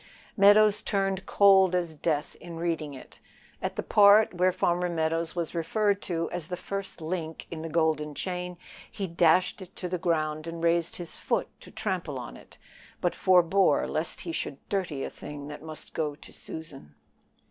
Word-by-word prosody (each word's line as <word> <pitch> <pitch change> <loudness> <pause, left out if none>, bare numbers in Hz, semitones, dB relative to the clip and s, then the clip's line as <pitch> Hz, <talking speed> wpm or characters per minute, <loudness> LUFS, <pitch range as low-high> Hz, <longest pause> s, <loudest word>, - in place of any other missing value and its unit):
Meadows 210 +1 +6
turned 195 -2 -1
cold 190 -2 +5
as 170 -3 -1
death 150 -1 -2
in 170 -1 -8
reading 165 -4 -2
it. 130 - -13 0.4
At - - -3
the - - -3
part 205 +1 +6
where 180 +1 +3
Farmer 180 -1 0
Meadows 165 0 -1
was 170 -2 -3
referred 200 +4 +1
to 165 -2 -2
as 175 -3 -4
the 180 0 -4
first 195 0 -6
link 160 -1 -4
in 160 -2 -5
the 165 - -5
golden 155 -2 0
chain, 180 0 -4 0.3
he 195 - -3
dashed 175 +2 +3
it 185 - -11
to 180 - -4
the 180 0 -3
ground 155 -2 -1
and 165 0 -6
raised 170 0 +1
his 175 -2 -7
foot - - -1
to - - -14
trample - - -3
on - - -7
it, - - -15 0.4
but - - 0
forbore 185 -2 +4
lest 155 +2 -3
he 170 - -5
should 140 - -4
dirty 180 -9 -2
a - - -3
thing 145 -1 -8
that 150 - -8
must 155 0 -10
go 150 -2 -2
to - - -15
Susan. 140 - -10
170 Hz, 180 wpm, -28 LUFS, 160-185 Hz, 0.4 s, Meadows